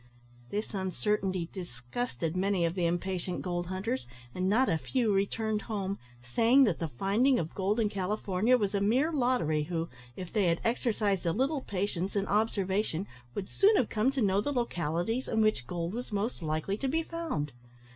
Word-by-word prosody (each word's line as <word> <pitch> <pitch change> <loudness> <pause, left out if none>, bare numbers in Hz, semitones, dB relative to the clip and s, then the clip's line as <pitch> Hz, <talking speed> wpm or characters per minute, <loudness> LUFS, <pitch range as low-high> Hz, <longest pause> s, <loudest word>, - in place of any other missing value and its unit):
This 210 +2 -3
uncertainty 190 -2 -1
disgusted 170 - -4
many 190 -1 +2
of 165 - 0
the 175 -2 +1
impatient 180 +1 -2
gold 175 -1 -2
hunters, 190 - -2 0.3
and 185 +1 0
not 250 +6 +4
a 165 -3 +1
few 235 - +1
returned 210 +2 0
home, 200 -3 -3 0.3
saying 240 - +6
that 205 -10 +2
the 165 - -1
finding 205 - +2
of 160 -1 -2
gold 200 +4 0
in 220 - +3
California 205 +3 +1
was 205 -4 -1
a 200 - +1
mere 255 +10 +3
lottery, 245 - +2
who, 165 0 -2 0.3
if 180 -2 -7
they 210 -3 +3
had 170 -1 +2
exercised 215 -6 +1
a - - +3
little 270 - 0
patience 195 -2 -2
and 200 -1 0
observation, 200 -3 +1 0.3
would 195 -2 -3
soon 415 +2 +4
have 250 - +2
come 220 +4 +2
to 270 -3 0
know 195 0 +3
the 290 - -1
localities 225 - -1
in 220 - 0
which 215 - +2
gold 170 +2 -3
was 245 +1 -5
most 205 +1 -2
likely 155 +5 -1
to 270 - -2
be 325 +5 +1
found. 320 - -3
200 Hz, 180 wpm, -30 LUFS, 180-230 Hz, 0.3 s, saying